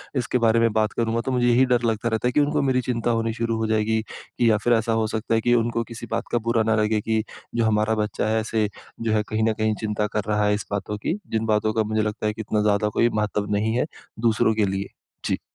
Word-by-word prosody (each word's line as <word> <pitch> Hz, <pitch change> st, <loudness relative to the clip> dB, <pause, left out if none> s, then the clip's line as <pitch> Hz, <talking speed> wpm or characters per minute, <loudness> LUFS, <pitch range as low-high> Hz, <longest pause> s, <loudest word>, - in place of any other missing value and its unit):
इसके 125 Hz, -1 st, 0 dB
बारे 115 Hz, +1 st, +4 dB
में 115 Hz, -1 st, +3 dB
बात 110 Hz, 0 st, +1 dB
करूँगा, 115 Hz, 0 st, 0 dB
तो 130 Hz, -, -3 dB
मुझे 125 Hz, -1 st, +2 dB
यही 120 Hz, +2 st, +5 dB
डर 125 Hz, -2 st, +2 dB
लगता 115 Hz, 0 st, 0 dB
रहता 110 Hz, +2 st, 0 dB
है 125 Hz, -, +1 dB
कि -, -, +2 dB
उनको 150 Hz, 0 st, +2 dB
मेरी 130 Hz, -2 st, +2 dB
चिंता 120 Hz, -1 st, -1 dB
होनी 115 Hz, -1 st, 0 dB
शुरू 115 Hz, 0 st, -1 dB
हो 110 Hz, 0 st, -1 dB
जाएगी 110 Hz, 0 st, +1 dB, 0.4 s
या 115 Hz, -3 st, +5 dB
फिर 120 Hz, -, +3 dB
ऐसा 115 Hz, 0 st, +1 dB
हो 110 Hz, -, 0 dB
सकता 110 Hz, +1 st, -1 dB
है 115 Hz, -, +2 dB
कि 120 Hz, +2 st, +2 dB
उनको 115 Hz, 0 st, 0 dB
किसी 115 Hz, 0 st, -8 dB
बात -, -, -2 dB
का 120 Hz, -, +2 dB
बुरा 115 Hz, -1 st, +3 dB
न -, -, +2 dB
लगे 105 Hz, 0 st, +1 dB
कि, 110 Hz, 0 st, 0 dB, 0.3 s
"जो 115 Hz, -, +2 dB
हमारा 110 Hz, 0 st, +2 dB
बच्चा 105 Hz, -1 st, -1 dB
है, 110 Hz, +1 st, +2 dB
ऐसे 110 Hz, -1 st, 0 dB, 0.3 s
जो 115 Hz, -1 st, 0 dB
है, 105 Hz, -1 st, +2 dB
कहीं 110 Hz, +1 st, -1 dB
न -, -, +1 dB
कहीं 110 Hz, 0 st, 0 dB
चिंता 105 Hz, -1 st, -1 dB
कर 105 Hz, 0 st, -2 dB
रहा 105 Hz, -1 st, +1 dB
है 105 Hz, -, +3 dB
इस 105 Hz, -1 st, -3 dB
बातों 100 Hz, +1 st, -3 dB
की।" 160 Hz, -, -2 dB
जिन 110 Hz, 0 st, 0 dB
बातों 110 Hz, 0 st, +1 dB
का 110 Hz, -, +1 dB
मुझे 110 Hz, 0 st, 0 dB
लगता 105 Hz, 0 st, -3 dB
है 105 Hz, -, 0 dB
कि 110 Hz, -, -6 dB
इतना 105 Hz, 0 st, 0 dB
ज़्यादा 105 Hz, 0 st, +2 dB
कोई 115 Hz, +3 st, +2 dB
महत्व 105 Hz, -1 st, -1 dB
नहीं 110 Hz, +2 st, 0 dB
है, 125 Hz, -, +1 dB, 0.3 s
दूसरों 110 Hz, -1 st, +2 dB
के 110 Hz, -, +2 dB
लिए। 95 Hz, 0 st, -2 dB, 0.4 s
जी। -, -, 0 dB
110 Hz, 265 wpm, -23 LUFS, 105-115 Hz, 0.4 s, यही